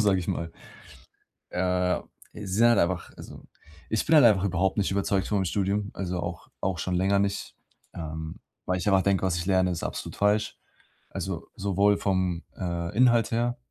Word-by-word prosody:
sage 100 Hz, -3 st, +3 dB
ich 90 Hz, -, -5 dB
mal. 85 Hz, -1 st, -2 dB, 1.0 s
Äh, 90 Hz, 0 st, +1 dB, 0.3 s
sie 105 Hz, -, -8 dB
sind 105 Hz, +5 st, +4 dB
halt 120 Hz, -, +4 dB
einfach 85 Hz, 0 st, 0 dB
also, -, -, -11 dB, 0.5 s
ich 110 Hz, -, 0 dB
bin 160 Hz, -, +4 dB
halt 150 Hz, -4 st, +8 dB
einfach 100 Hz, -4 st, +5 dB
überhaupt 95 Hz, 0 st, +1 dB
nicht 100 Hz, -, +1 dB
überzeugt 100 Hz, 0 st, 0 dB
von 105 Hz, -, 0 dB
meinem 95 Hz, -, +1 dB
Studium, 100 Hz, +2 st, -1 dB
also 90 Hz, -2 st, -3 dB
auch 85 Hz, -2 st, -6 dB
auch 95 Hz, -3 st, -1 dB
schon 90 Hz, +2 st, -2 dB
länger 95 Hz, +2 st, +2 dB
nicht, 100 Hz, 0 st, -2 dB, 0.4 s
ähm, 80 Hz, 0 st, -6 dB, 0.3 s
weil 90 Hz, 0 st, 0 dB
ich 90 Hz, -, -5 dB
einfach 95 Hz, -2 st, +4 dB
denke, 100 Hz, -1 st, +1 dB
was 90 Hz, -2 st, 0 dB
ich 85 Hz, +1 st, -3 dB
lerne, 95 Hz, -1 st, +3 dB
ist 85 Hz, -, -3 dB
absolut -, -, -5 dB
falsch. 105 Hz, +1 st, +1 dB, 0.5 s
Also, -, -, -5 dB
sowohl 100 Hz, +1 st, +2 dB
vom, 95 Hz, -4 st, 0 dB
äh, 85 Hz, 0 st, -3 dB
Inhalt 120 Hz, -2 st, +4 dB
her 120 Hz, +1 st, 0 dB
95 Hz, 185 wpm, -27 LUFS, 90-100 Hz, 1.0 s, halt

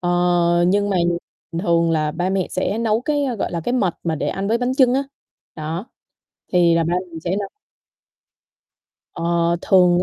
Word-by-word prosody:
ờ, 175 Hz, -1 st, +2 dB
nhưng 205 Hz, +1 st, +2 dB
mà 190 Hz, -, +1 dB, 0.7 s
thường 170 Hz, -3 st, +2 dB
là 155 Hz, -2 st, +1 dB
ba 175 Hz, +3 st, -1 dB
mẹ 190 Hz, -2 st, 0 dB
sẽ 200 Hz, +4 st, -1 dB
nấu, 225 Hz, -1 st, +1 dB
cái, 290 Hz, +2 st, 0 dB
a, 255 Hz, -3 st, -1 dB
gọi 200 Hz, -, -3 dB
là, 170 Hz, -, -2 dB
cái, 245 Hz, -, -2 dB
mật 195 Hz, -9 st, +1 dB
mà 165 Hz, -1 st, 0 dB
để -, -, -2 dB
ăn 195 Hz, +1 st, -3 dB
với 230 Hz, -, +2 dB
bánh 250 Hz, +1 st, -1 dB
chưng 255 Hz, -2 st, +4 dB
á, 270 Hz, -, +2 dB, 0.5 s
đó, 160 Hz, +6 st, -4 dB, 0.7 s
thì 175 Hz, -2 st, +4 dB
là 165 Hz, -, +2 dB
ba 170 Hz, +2 st, -1 dB, 0.2 s
mình 165 Hz, -, -7 dB
sẽ 175 Hz, +3 st, -2 dB
nấu. 200 Hz, -, -3 dB, 1.7 s
Ờ, 170 Hz, 0 st, 0 dB
thường 180 Hz, -2 st, +4 dB
175 Hz, 185 wpm, -21 LUFS, 170-210 Hz, 1.7 s, chưng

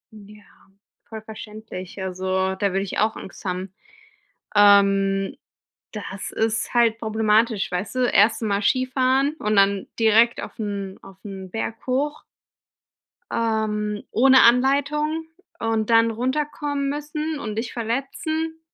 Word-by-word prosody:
Ja, 210 Hz, 0 st, -14 dB, 0.7 s
voll 220 Hz, -1 st, -7 dB
verständlich, 215 Hz, -4 st, -9 dB
also 190 Hz, 0 st, -1 dB
da 200 Hz, +1 st, 0 dB
würde 195 Hz, +1 st, 0 dB
ich 195 Hz, -, -4 dB
auch 220 Hz, +1 st, +1 dB
Angst -, -, -10 dB
haben. 185 Hz, +1 st, -4 dB, 0.8 s
Ähm, 195 Hz, -1 st, +4 dB, 0.6 s
das 200 Hz, -2 st, -6 dB
ist 225 Hz, +2 st, -1 dB
halt 230 Hz, -2 st, +3 dB
problematisch, 220 Hz, -1 st, +1 dB
weißt 180 Hz, +7 st, -3 dB
du, -, -, -1 dB
1. 220 Hz, +2 st, +3 dB
mal 200 Hz, -1 st, 0 dB
Skifahren 260 Hz, +4 st, +2 dB
und 210 Hz, -4 st, -1 dB
dann 200 Hz, 0 st, +3 dB
direkt 225 Hz, +2 st, +4 dB
auf -, -, -9 dB
'n 200 Hz, -2 st, -4 dB
auf 190 Hz, -1 st, -14 dB
'n 190 Hz, -2 st, -8 dB
Berg 225 Hz, 0 st, -5 dB
hoch. 280 Hz, +4 st, -1 dB, 1.1 s
Ähm, 215 Hz, -2 st, -1 dB
ohne 260 Hz, +3 st, +6 dB
Anleitung 285 Hz, +6 st, +2 dB, 0.3 s
und 225 Hz, -1 st, -1 dB
dann 230 Hz, 0 st, +5 dB
runterkommen 280 Hz, +3 st, -2 dB
müssen 300 Hz, +1 st, -4 dB
und 215 Hz, -4 st, -5 dB
dich 225 Hz, +1 st, -3 dB
verletzen. 315 Hz, +7 st, -3 dB
220 Hz, 125 wpm, -23 LUFS, 200-255 Hz, 1.1 s, ohne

